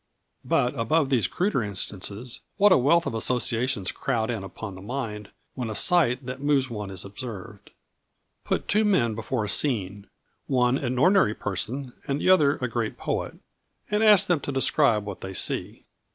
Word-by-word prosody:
But 125 Hz, +2 st, +1 dB
above 140 Hz, +5 st, +1 dB
these 115 Hz, -8 st, +2 dB
cruder 180 Hz, -, 0 dB
instances, 100 Hz, +3 st, -4 dB, 0.2 s
what 205 Hz, 0 st, +5 dB
a -, -, +7 dB
wealth 165 Hz, +7 st, +3 dB
of -, -, -3 dB
associations 115 Hz, -2 st, -1 dB
crowd 110 Hz, 0 st, -2 dB
in 110 Hz, -5 st, -4 dB
upon 100 Hz, +1 st, -8 dB
the 95 Hz, -, -11 dB
mind, 105 Hz, -2 st, -5 dB, 0.2 s
when 125 Hz, -4 st, -4 dB
a 110 Hz, -, -5 dB
sight 140 Hz, -6 st, +2 dB
that 130 Hz, +1 st, -6 dB
moves 140 Hz, -3 st, +1 dB
one 105 Hz, -3 st, -5 dB
is 95 Hz, -1 st, -4 dB
observed. 105 Hz, -1 st, -8 dB, 0.7 s
Put -, -, -2 dB
two 215 Hz, +2 st, +2 dB
men 140 Hz, -, +2 dB
before 115 Hz, +1 st, -3 dB
a -, -, -5 dB
scene, 100 Hz, -6 st, +1 dB, 0.4 s
one 125 Hz, 0 st, +2 dB
an 130 Hz, -2 st, -2 dB
ordinary 180 Hz, -, +4 dB
person 125 Hz, +7 st, -3 dB
and 140 Hz, 0 st, -1 dB
the 185 Hz, -, +3 dB
other 150 Hz, -6 st, +4 dB
a 125 Hz, -, -2 dB
great 115 Hz, -2 st, -3 dB
poet, -, -, -3 dB, 0.5 s
and 210 Hz, +1 st, +2 dB
ask 210 Hz, -3 st, +6 dB
them 175 Hz, -4 st, +1 dB
to 140 Hz, -, -5 dB
describe 135 Hz, -5 st, +2 dB
what 100 Hz, -2 st, -7 dB
they 95 Hz, 0 st, -7 dB
see. -, -, -1 dB
125 Hz, 175 wpm, -25 LUFS, 105-140 Hz, 0.7 s, a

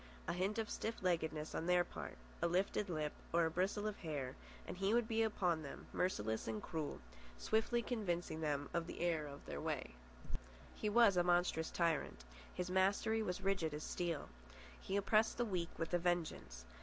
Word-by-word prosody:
A -, -, +1 dB
hint 190 Hz, +5 st, 0 dB
of 225 Hz, -1 st, 0 dB
stiff 225 Hz, -1 st, -3 dB
leggedness 160 Hz, -3 st, 0 dB
on 165 Hz, -, -2 dB
their 180 Hz, 0 st, +5 dB
part, 70 Hz, -, -7 dB, 0.2 s
a -, -, +4 dB
lifted 190 Hz, +3 st, +1 dB
lip 155 Hz, -3 st, -1 dB, 0.2 s
or 170 Hz, 0 st, +4 dB
a 160 Hz, -, 0 dB
bristle 190 Hz, +4 st, 0 dB
of 215 Hz, -1 st, -2 dB
hair, 145 Hz, -6 st, -3 dB, 0.3 s
and -, -, -5 dB
he 195 Hz, +4 st, +2 dB
would 240 Hz, -2 st, +3 dB
be 225 Hz, -1 st, +2 dB
upon 180 Hz, -7 st, +2 dB
them, 140 Hz, -, -7 dB
merciless 110 Hz, -, 0 dB
and 110 Hz, -1 st, -1 dB
cruel, 155 Hz, +4 st, -3 dB, 0.4 s
swiftly 225 Hz, -, +2 dB
convincing 175 Hz, -9 st, -1 dB
them 145 Hz, -2 st, 0 dB
of 170 Hz, -1 st, 0 dB
the -, -, -6 dB
error 165 Hz, -3 st, +1 dB
of 140 Hz, 0 st, -9 dB
their -, -, -4 dB
way. -, -, -2 dB, 0.8 s
He 210 Hz, -, -1 dB
was 210 Hz, -3 st, +6 dB
a 175 Hz, -, +5 dB
monstrous 175 Hz, -2 st, +2 dB
tyrant. 165 Hz, -, 0 dB, 0.3 s
His 180 Hz, 0 st, -3 dB
mastery 200 Hz, +4 st, +3 dB
was 180 Hz, -2 st, -2 dB
rigid 190 Hz, -6 st, +1 dB
as 150 Hz, -, -5 dB
steel. 170 Hz, -4 st, -2 dB, 0.5 s
He 195 Hz, -, -2 dB
oppressed 215 Hz, +2 st, +3 dB
the 240 Hz, -, +2 dB
weak 180 Hz, -5 st, -1 dB
with 165 Hz, +1 st, -3 dB
a 175 Hz, -, +4 dB
vengeance. 170 Hz, -, -1 dB
175 Hz, 185 wpm, -39 LUFS, 160-200 Hz, 0.8 s, was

